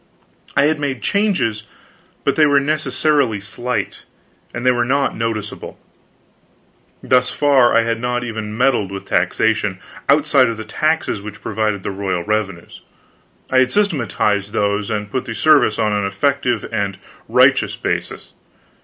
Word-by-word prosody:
I 140 - +5
had 155 +1 +2
made 140 -3 -3
changes, 185 - 0 0.6
but - - +1
they 155 -1 +5
were 145 -1 +4
necessarily 145 -5 0
slight, 120 +5 -4 0.5
and 120 +1 -6
they 130 - +6
were 120 -1 +1
not 135 +3 0
noticeable. 110 -2 -4 1.3
Thus 125 0 +3
far, 135 -5 +3
I 115 - +4
had 115 0 -2
not 125 0 -1
even 110 -2 -5
meddled 120 -6 +1
with 95 0 -7
taxation, 105 -4 0 0.3
outside 145 -2 +4
of 115 -1 -3
the 110 - -7
taxes 155 -1 -1
which 105 +1 -9
provided 105 -3 -1
the - - -3
royal 95 -3 -2
revenues. 100 -4 -3 0.7
I 130 - +4
had 130 -1 +2
systematized 110 - 0
those, 100 0 0
and 105 -1 -3
put 130 - -2
the 115 - -5
service 140 -2 +4
on 105 -1 +1
an 105 0 0
effective 120 +3 0
and 100 -3 -2 0.3
righteous - - +4
basis. - - -4
115 Hz, 145 wpm, -19 LUFS, 105-140 Hz, 1.3 s, they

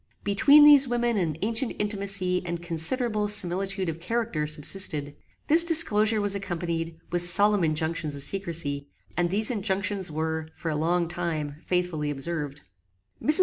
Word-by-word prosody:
Between 280 +9 +4
these 290 -2 +6
women 240 -1 -1
an 160 -5 -3
ancient 230 +3 -1
intimacy 195 -3 -1
and 170 -1 -5
considerable 210 +7 +2
similitude 195 -1 +1
of 165 0 -5
character 215 -5 -3
subsisted. 150 -1 0 0.3
This 325 +3 +6
disclosure 225 -11 +4
was 205 -1 0
accompanied 170 -4 -5
with 175 0 -1
solemn 200 +3 +4
injunctions 160 -1 -3
of 140 - -10
secrecy, 160 -6 -2 0.3
and 175 0 -1
these 215 +5 0
injunctions 200 -3 -2
were, 160 0 -4
for 165 - -5
a - - -4
long 170 +3 -1
time, 160 -4 -5
faithfully 175 -5 -2
observed. 145 0 -5 0.6
Mrs. 305 +4 +1
180 Hz, 145 wpm, -24 LUFS, 160-210 Hz, 0.6 s, these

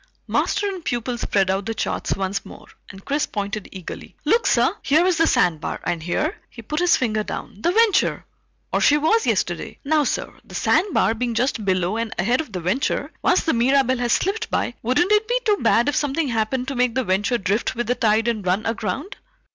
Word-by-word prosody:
Master - - 0
and 380 -4 -5
pupil 240 -1 -2
spread 195 -3 +1
out 195 +1 -2
the 225 - -2
charts - - -2
once 195 +1 -2
more, - - -12 0.2
and 195 -1 -12
Chris 285 +1 0
pointed 205 0 -4
eagerly. 185 -3 -9
"Look, 465 +1 +3
sir! - - +3
Here 315 +5 +3
is 365 -3 +2
the 330 -1 +3
sandbar, 165 -3 +1
and 175 -2 -2
here" 300 - -1
he 230 - -11
put 300 +7 -3
his 355 0 +4
finger 215 -4 0
down 210 -1 -7
"the 345 - +2
Venture. 440 0 +2 0.5
Or - - +2
she 295 - +5
was, 325 +10 +2
yesterday. - - -1
Now 305 +1 +3
sir, - - -2
the - - -12
sandbar 375 - +2
being 235 0 -2
just 240 -1 0
below 185 +1 0
and 230 -1 -3
ahead 240 - +1
of 300 - -10
the 180 -3 -4
Venture, 260 - -1
once 360 - +3
the 325 - +1
Mirabelle 260 +1 +2
has 240 -1 +1
slipped 435 +4 -1
by, - - -1
wouldn't 255 - +1
it 425 +1 +3
be - - +1
too 420 -2 +3
bad 235 - +3
if 290 - +1
something 290 0 0
happened 240 +3 -1
to 275 - -4
make 250 -2 +1
the 260 - +1
Venture 205 +4 +1
drift 205 +5 -1
with 240 +1 -2
the 245 - +1
tide 225 -2 +2
and 225 -3 -1
run 185 +4 0
aground?" 225 - -3
240 Hz, 210 wpm, -22 LUFS, 210-305 Hz, 0.5 s, she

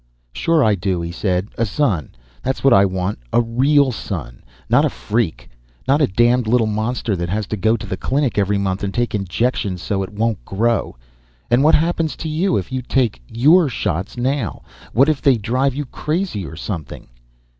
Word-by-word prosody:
"Sure 165 - +2
I 110 - +4
do," 95 -1 -1
he 85 0 -4
said. 90 +2 -1
"A 115 - +3
son. 100 - -1 0.3
That's 130 +1 -3
what 135 -2 +6
I 100 -1 +6
want. 95 -3 -2
A - - +3
real 130 +4 +3
son. - - -6 0.3
Not - - +4
a - - +2
freak. 110 -5 -2 0.4
Not 140 +3 +3
a 145 - +4
damned 120 +4 +2
little 120 0 +3
monster 110 +1 -1
that 85 -1 -3
has 105 +3 -1
to 110 - -3
go 110 +3 +2
to 105 - -8
the 95 -1 -4
Clinic 135 -5 0
every 100 0 +1
month 95 0 -2
and 100 - -1
take 120 +3 -1
injections 100 0 -1
so 100 -2 -1
it 95 - -4
won't 110 0 -1
grow. 115 +4 0 0.6
And 120 +3 +4
what 155 - +6
happens 165 0 0
to 160 - -5
you 175 +5 +1
if 95 - -4
you 130 0 -2
take 125 - 0
your 150 +8 +4
shots 95 -3 -3
now? 125 - -2 0.3
What 135 +5 +4
if 155 -3 +1
they 135 -4 +4
drive 125 +5 0
you 145 +1 -3
crazy 150 - -3
or - - -9
something?" 75 -4 -6
115 Hz, 195 wpm, -19 LUFS, 100-135 Hz, 0.6 s, what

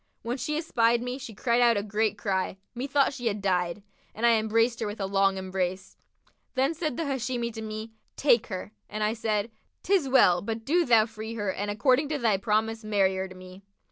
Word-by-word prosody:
When 240 +3 -2
she 300 +4 -2
espied 235 -7 +2
me, 250 +2 -4
she 245 -5 -8
cried 235 +2 +1
out 235 -2 +5
a 200 - -1
great 215 0 0
cry, 190 -2 -1 0.2
methought 275 +3 +1
she 245 -3 -3
had 210 -1 -1
died, 180 -1 -1 0.3
and 225 - -1
I 235 - +6
embraced 225 +2 +1
her 220 - -2
with 205 +1 -6
a 195 - -1
long 195 0 +2
embrace. 185 0 -3 0.6
Then 270 +4 +2
said 310 -5 -3
the 330 - -1
Hashimi 245 -3 -2
to 220 - -6
me, 215 +1 -6 0.2
'Take 240 -5 +3
her;' 190 0 -6 0.2
and 215 0 -3
I 210 +1 +1
said, 220 -1 -1 0.3
''Tis 370 -9 +2
well: 180 -10 +5
but 225 +2 -4
do 340 +4 +2
thou 230 -3 +5
free 220 0 -7
her 205 -4 -2
and 205 +1 -3
according 260 +7 +2
to 305 - -1
thy 225 -6 +2
promise 220 +2 0
marry 200 -3 +2
her 190 0 -2
to 185 - -12
me.' 185 +1 -12
220 Hz, 210 wpm, -27 LUFS, 200-245 Hz, 0.6 s, I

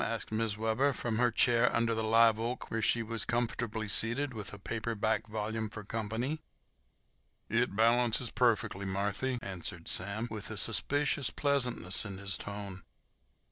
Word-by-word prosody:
asked 115 -2 -3
Mrs. 110 -1 0
Webber, 110 +6 +1
from 115 -2 -2
her 120 0 +4
chair 120 +1 +4
under 115 0 +2
the 110 0 -1
live 115 0 +5
oak, 120 +2 -3
where 115 - -1
she 115 +2 +3
was 115 -2 0
comfortably 115 -1 -1
seated 120 +7 +1
with 105 -3 -4
a 100 - -7
paper 115 +3 -3
back 110 +2 0
volume 110 0 -3
for 105 -1 -8
company. 115 +8 -3 1.1
"It 115 -2 +1
balances 115 +1 +3
perfeckly, 105 -5 +1
Marthy," 100 +7 -1
answered 85 -4 -4
Sam, 100 +5 -2
with 110 -1 -4
a 110 - -5
suspicious 140 +5 +2
pleasantness 125 -10 0
in 100 -3 -6
his 100 0 -3
tone. 100 -2 -6
115 Hz, 155 wpm, -32 LUFS, 105-120 Hz, 1.1 s, live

